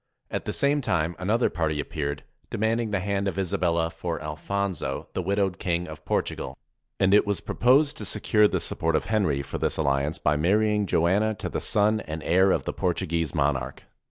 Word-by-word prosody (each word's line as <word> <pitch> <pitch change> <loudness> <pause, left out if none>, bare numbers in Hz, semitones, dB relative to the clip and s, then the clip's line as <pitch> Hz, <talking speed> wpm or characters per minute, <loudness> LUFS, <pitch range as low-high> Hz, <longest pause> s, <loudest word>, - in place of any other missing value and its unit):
At - - -3
the - - -2
same 145 +1 +2
time 80 - 0
another 110 +6 +2
party 80 -3 -1
appeared, 70 0 -3 0.3
demanding 115 +1 0
the 100 -3 -1
hand 100 +1 -1
of 95 -2 -3
Isabella 85 -3 0
for 85 0 -4
Alfonso, 90 +4 -3
the - - -1
widowed 95 0 0
King 90 -1 -1
of 80 0 -9
Portugal. - - -2 0.4
And 95 0 +4
it 105 0 +5
was 100 -2 0
proposed 140 +4 +3
to - - -6
secure 105 -2 +3
the - - -1
support 80 0 -1
of - - 0
Henry 95 -11 +1
for 70 - -5
this - - 0
alliance 70 0 0
by 75 0 +1
marrying 105 +5 +2
Joanna 100 +7 +2
to 95 - -5
the - - -3
son 105 +1 +2
and 80 -5 -6
heir 95 +3 +4
of - - +1
the - - -2
Portuguese 85 -3 -1
monarch. 70 -3 -1
90 Hz, 185 wpm, -26 LUFS, 80-105 Hz, 0.4 s, it